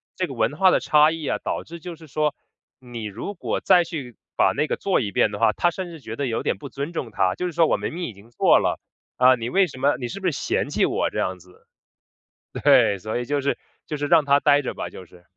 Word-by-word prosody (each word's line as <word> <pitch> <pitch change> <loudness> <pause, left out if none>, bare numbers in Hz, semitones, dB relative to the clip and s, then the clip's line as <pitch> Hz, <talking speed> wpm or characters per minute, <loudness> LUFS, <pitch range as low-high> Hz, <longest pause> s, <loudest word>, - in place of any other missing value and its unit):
这 185 - -1
个 135 - -7
文 115 +5 0
化 185 +2 +5
的 - - +3
差 150 +1 +4
异 160 -3 -5
啊， - - 0
导 - - -3
致 170 +1 -10
就 175 0 -7
是 160 -1 -14
说， 150 +1 0 0.5
你 120 -3 -8
如 110 - -5
果 175 - -3
再 175 - +5
去 145 -9 -7 0.2
把 - - +4
那 150 - +1
个 - - -2
做 195 - +1
一 100 -4 -3
遍 105 - +2
的 105 - -6
话， 115 -1 +4
她 175 +10 +1
甚 185 0 -6
至 165 -2 -10
觉 115 -4 -7
得 140 - -2
有 115 - -2
点 - - -1
不 - - -9
尊 140 +5 -5
重 120 -8 -4
她。 95 -2 +1
就 180 - -3
是 180 - -2
说： 165 -1 +3
“我 - - +2
明 - - -4
明 175 - -5
已 115 - -6
经 100 +4 -18
做 120 - +4
了， - - -1 0.4
啊， 130 0 +6
你 115 0 -4
为 190 +2 +3
什 140 - -11
么 140 +2 +2
你 125 - -4
是 200 +9 -7
不 - - -6
是 175 - +2
嫌 - - -2
弃 - - +2
我 - - 0
这 - - -4
样 95 0 -1
子？” 90 +1 -21 1.0
对， 100 - +5
所 110 +5 -4
以 125 - -4
就 145 +3 0
是 140 0 0 0.3
就 150 - -4
是 145 0 -2
让 150 - +4
她 140 0 +4
待 145 -1 +3
着 - - -3
吧， - - -5
就 95 - -11
是。 90 0 -19
140 Hz, 295 characters per minute, -23 LUFS, 115-165 Hz, 1.0 s, 啊